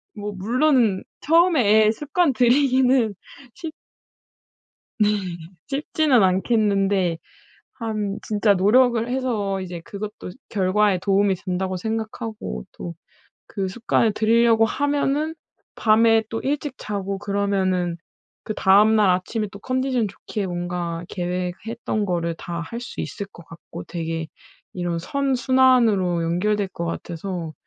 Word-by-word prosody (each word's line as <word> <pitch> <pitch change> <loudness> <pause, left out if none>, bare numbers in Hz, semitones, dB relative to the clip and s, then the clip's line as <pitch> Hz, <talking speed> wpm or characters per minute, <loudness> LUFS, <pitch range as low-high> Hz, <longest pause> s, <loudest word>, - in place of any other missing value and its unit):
뭐 210 0 -5
물론 235 -1 +2 0.2
처음에 260 - +4
습관들이기는 260 - +2 0.4
쉽 325 -2 -7 1.3
네. 210 0 +3 0.5
쉽지는 280 -2 +2
않겠는데 195 -2 +2 0.6
한 215 -4 -3
진짜 210 -1 +2
노력을 230 +4 +3
해서 225 -7 -1
이제 175 -2 -6
그것도 210 -2 -7 0.2
결과에 195 0 +2
도움이 195 +1 +2
된다고 185 +1 -3
생각하고 220 - -4
또 170 - -7 0.6
그 195 -3 -3
습관을 225 +2 +1
들이려고 225 +1 +4
하면은 285 +4 0 0.4
밤에 225 0 +4
또 225 - -3
일찍 290 0 -2
자고 200 -1 -4
그러면은 195 -3 0 0.5
그다음 215 +1 +4
날 205 -3 +4
아침에 200 +4 0
또 200 - -9
컨디션 255 -3 0
좋게 200 +1 -5
뭔가 175 -1 -4
계획했던 185 +5 -3
거를 170 -2 -1
다 170 0 -6
할 235 +8 -6
수 240 - -8
있을 200 - -4
것 170 - -14
같고 165 - -10
되게 165 -1 -4 0.5
이런 175 -2 -2
선순환으로 250 -7 +2
연결될 200 +5 0
것 175 -2 -6
같아서 170 0 -5
210 Hz, 250 characters per minute, -23 LUFS, 185-240 Hz, 1.3 s, 처음에